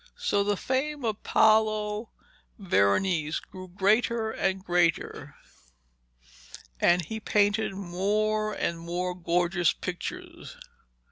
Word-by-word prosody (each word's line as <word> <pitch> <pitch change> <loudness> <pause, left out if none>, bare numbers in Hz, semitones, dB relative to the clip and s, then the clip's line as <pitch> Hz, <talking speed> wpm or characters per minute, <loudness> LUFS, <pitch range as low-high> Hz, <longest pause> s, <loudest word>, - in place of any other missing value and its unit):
So 205 - +1
the 205 0 0
fame 270 +3 -2
of 215 -2 -2
Paolo 215 0 +2 0.5
Veronese 155 - +1
grew 185 0 -11
greater 220 +4 +1
and 190 -2 -2
greater, 175 -1 0 1.4
and 175 -1 +3
he 220 +6 -5
painted 205 -1 +1
more 210 +3 -1
and 170 -5 -2
more 175 +2 -3
gorgeous 175 0 +1
pictures. 180 -2 -7
195 Hz, 95 wpm, -27 LUFS, 175-215 Hz, 1.4 s, and